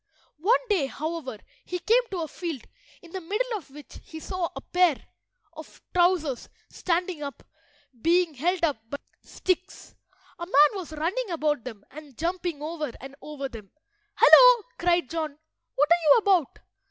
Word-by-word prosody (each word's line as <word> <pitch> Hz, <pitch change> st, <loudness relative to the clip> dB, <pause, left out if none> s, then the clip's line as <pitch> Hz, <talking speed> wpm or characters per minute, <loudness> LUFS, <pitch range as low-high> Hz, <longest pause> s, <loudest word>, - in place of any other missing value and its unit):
One 470 Hz, +8 st, +2 dB
day, 375 Hz, -, +1 dB
however, 300 Hz, -4 st, -5 dB, 0.3 s
he 360 Hz, -, -4 dB
came 455 Hz, +7 st, +3 dB
to 370 Hz, -3 st, -3 dB
a -, -, -4 dB
field, 325 Hz, -6 st, -6 dB, 0.4 s
in 335 Hz, -, -14 dB
the 380 Hz, -, -5 dB
middle 435 Hz, +8 st, -2 dB
of 350 Hz, -10 st, -8 dB
which 290 Hz, +1 st, -12 dB
he 320 Hz, -, -10 dB
saw 365 Hz, +1 st, -3 dB
a -, -, -6 dB
pair 360 Hz, -6 st, +2 dB, 0.6 s
of 315 Hz, -1 st, -12 dB
trousers 345 Hz, -7 st, +1 dB, 0.2 s
standing 350 Hz, -2 st, -1 dB
up, 280 Hz, -3 st, -7 dB, 0.6 s
being 345 Hz, +1 st, +3 dB
held 340 Hz, +6 st, -1 dB
up 295 Hz, -6 st, +2 dB
by 285 Hz, -, -4 dB, 0.2 s
sticks. 370 Hz, 0 st, -3 dB, 0.5 s
A 345 Hz, -, -5 dB
man -, -, -17 dB, 0.2 s
was 365 Hz, -6 st, -6 dB
running 370 Hz, +10 st, -2 dB
about 305 Hz, -6 st, -1 dB
them 220 Hz, -5 st, -9 dB
and 290 Hz, -2 st, -12 dB
jumping 345 Hz, -2 st, -3 dB
over 310 Hz, -3 st, -4 dB
and 270 Hz, +1 st, -10 dB
over 290 Hz, -2 st, -5 dB
them. 220 Hz, -6 st, -11 dB, 0.5 s
"Hullo!" -, -, +8 dB, 0.2 s
cried 345 Hz, -3 st, +2 dB
John. 310 Hz, -2 st, -4 dB, 0.4 s
"What 290 Hz, +2 st, +3 dB
are 345 Hz, 0 st, +5 dB
you -, -, +8 dB
about?" 385 Hz, -, +2 dB
335 Hz, 160 wpm, -26 LUFS, 295-365 Hz, 0.6 s, Hullo